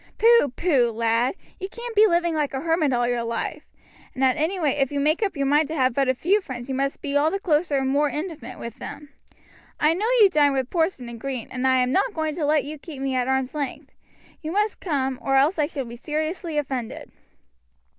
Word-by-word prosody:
Pooh, 465 Hz, -, +5 dB
pooh, 275 Hz, -9 st, +2 dB
lad! 230 Hz, +5 st, +1 dB, 0.2 s
you 380 Hz, 0 st, -5 dB
can't 470 Hz, +2 st, -7 dB
be 430 Hz, +1 st, +7 dB
living 345 Hz, -2 st, +1 dB
like 295 Hz, -3 st, -1 dB
a 265 Hz, -, -2 dB
hermit 325 Hz, -2 st, +1 dB
all 240 Hz, -1 st, +1 dB
your 245 Hz, -1 st, 0 dB
life; 230 Hz, +6 st, -3 dB, 0.5 s
and 265 Hz, -, -1 dB
at 260 Hz, -1 st, +4 dB
any 320 Hz, +5 st, -1 dB
rate 295 Hz, -4 st, +1 dB
if 270 Hz, -1 st, +1 dB
you 285 Hz, -, -1 dB
make 305 Hz, +6 st, +1 dB
up 395 Hz, -7 st, -1 dB
your 275 Hz, -, 0 dB
mind 295 Hz, +2 st, +3 dB
to 315 Hz, -, -4 dB
have 260 Hz, -4 st, +2 dB
but 275 Hz, +1 st, +1 dB
a 260 Hz, -, +2 dB
few 390 Hz, +10 st, +2 dB
friends 255 Hz, -7 st, -7 dB
you 270 Hz, -, -3 dB
must 275 Hz, +1 st, -2 dB
be 285 Hz, -1 st, -3 dB
all 290 Hz, +2 st, +4 dB
the 390 Hz, -, -1 dB
closer 310 Hz, -4 st, +1 dB
and 270 Hz, -1 st, 0 dB
more 290 Hz, +2 st, +2 dB
intimate 300 Hz, -6 st, -6 dB
with 235 Hz, -1 st, -8 dB
them. 295 Hz, -1 st, -8 dB, 0.7 s
I 305 Hz, +2 st, +4 dB
know 405 Hz, +6 st, -1 dB
you 400 Hz, -3 st, +7 dB
dine 290 Hz, -4 st, +4 dB
with 265 Hz, -1 st, -2 dB
Porson 325 Hz, -7 st, 0 dB
and 235 Hz, -1 st, -8 dB
Green, 260 Hz, -2 st, -5 dB
and 260 Hz, 0 st, -1 dB
I 260 Hz, -, +4 dB
am 250 Hz, 0 st, +1 dB
not 400 Hz, -, +1 dB
going 315 Hz, -1 st, -1 dB
to 310 Hz, -, 0 dB
let 300 Hz, 0 st, +3 dB
you 300 Hz, +1 st, -7 dB
keep 295 Hz, -2 st, -9 dB
me 270 Hz, 0 st, -2 dB
at 250 Hz, -1 st, 0 dB
arm's 265 Hz, -1 st, 0 dB
length; 285 Hz, -4 st, -5 dB, 0.5 s
you 315 Hz, -, -4 dB
must 415 Hz, +3 st, 0 dB
come, 270 Hz, -6 st, -1 dB
or 270 Hz, -, 0 dB
else 295 Hz, +6 st, +3 dB
I 295 Hz, -, +2 dB
shall 285 Hz, -5 st, -5 dB
be 235 Hz, 0 st, -9 dB
seriously 310 Hz, +4 st, -3 dB
offended." 265 Hz, -5 st, -4 dB
290 Hz, 235 wpm, -24 LUFS, 260-325 Hz, 0.7 s, be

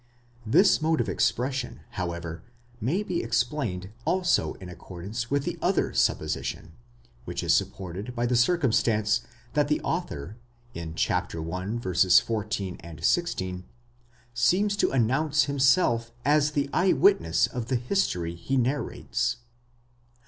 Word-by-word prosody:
'* 120 Hz, -1 st, -29 dB
This 195 Hz, -4 st, +5 dB
mode 160 Hz, 0 st, +2 dB
of 120 Hz, -, 0 dB
expression, 125 Hz, +6 st, -1 dB
however, 85 Hz, -5 st, -4 dB, 0.4 s
may 150 Hz, -, 0 dB
be 180 Hz, -4 st, -2 dB
explained 115 Hz, -4 st, -1 dB
also 180 Hz, +3 st, +1 dB
in 95 Hz, -, -10 dB
accordance 95 Hz, +6 st, -6 dB
with 140 Hz, 0 st, +1 dB
the -, -, -4 dB
other -, -, +1 dB
supposition,!* -, -, -1 dB, 0.5 s
which -, -, -4 dB
is -, -, +3 dB
supported 95 Hz, +6 st, -2 dB
by 120 Hz, 0 st, 0 dB
the 125 Hz, +1 st, +1 dB
circumstance 120 Hz, -6 st, +2 dB, 0.3 s
that 150 Hz, -1 st, +2 dB
the 150 Hz, -, +1 dB
author 110 Hz, -, -4 dB, 0.4 s
in 80 Hz, -1 st, -6 dB
1. 90 Hz, +9 st, -2 dB
14, 95 Hz, -2 st, +1 dB
16, 95 Hz, -, 0 dB, 0.7 s
seems 190 Hz, -, +2 dB
to -, -, +2 dB
announce 135 Hz, +5 st, +2 dB
himself 130 Hz, -4 st, +2 dB
as 150 Hz, +1 st, +3 dB
the 145 Hz, -1 st, 0 dB
eye 185 Hz, +1 st, +3 dB
witness 395 Hz, +1 st, +4 dB
of 120 Hz, -2 st, -5 dB
the 130 Hz, -, 0 dB
history 120 Hz, -, 0 dB
he 85 Hz, +11 st, -2 dB
narrates. 130 Hz, +4 st, -1 dB
120 Hz, 125 wpm, -27 LUFS, 95-145 Hz, 0.7 s, This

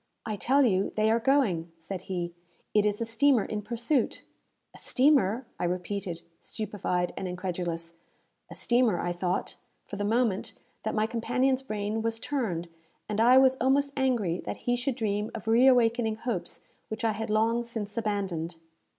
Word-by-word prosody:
"I 215 Hz, -2 st, -2 dB
tell 270 Hz, +6 st, +3 dB
you, 195 Hz, -4 st, +1 dB
they 215 Hz, +1 st, +3 dB
are 230 Hz, -, +3 dB
going," 225 Hz, -, +2 dB
said 175 Hz, +3 st, -6 dB
he. 175 Hz, -2 st, -2 dB, 0.4 s
"It 210 Hz, 0 st, +4 dB
is 210 Hz, +2 st, -1 dB
a -, -, +1 dB
steamer 230 Hz, +1 st, +3 dB
in 210 Hz, -1 st, -3 dB
pursuit." 235 Hz, +4 st, -1 dB, 0.5 s
"A -, -, -12 dB
steamer!" 260 Hz, -4 st, +3 dB
I -, -, 0 dB
repeated, 180 Hz, -1 st, -3 dB, 0.2 s
stupefied 195 Hz, -4 st, -2 dB
and 190 Hz, -, -4 dB
incredulous. 175 Hz, -2 st, -4 dB, 0.5 s
"A -, -, -9 dB
steamer!" 235 Hz, -7 st, +2 dB
I 175 Hz, -, -1 dB
thought, 180 Hz, +1 st, -2 dB, 0.3 s
for 200 Hz, -, -7 dB
the 205 Hz, -, -2 dB
moment, 220 Hz, -2 st, +1 dB, 0.3 s
that -, -, -2 dB
my 215 Hz, 0 st, +2 dB
companion's 255 Hz, +3 st, +1 dB
brain 215 Hz, -3 st, -3 dB
was 225 Hz, 0 st, -1 dB
turned, 220 Hz, -, -2 dB, 0.4 s
and 210 Hz, +1 st, 0 dB
I 245 Hz, +3 st, +7 dB
was 265 Hz, 0 st, +5 dB
almost 280 Hz, +2 st, +2 dB
angry 235 Hz, -10 st, +1 dB
that -, -, -6 dB
he 245 Hz, -, +2 dB
should 245 Hz, +1 st, -2 dB
dream 210 Hz, -1 st, -1 dB
of 220 Hz, -1 st, -7 dB
reawakening 235 Hz, -1 st, +4 dB
hopes 220 Hz, -6 st, -4 dB, 0.3 s
which 220 Hz, +1 st, -4 dB
I 225 Hz, -, +3 dB
had 220 Hz, +1 st, -4 dB
long 225 Hz, +2 st, +2 dB
since 220 Hz, -3 st, -5 dB
abandoned. 195 Hz, -7 st, -2 dB
220 Hz, 165 wpm, -28 LUFS, 190-240 Hz, 0.5 s, I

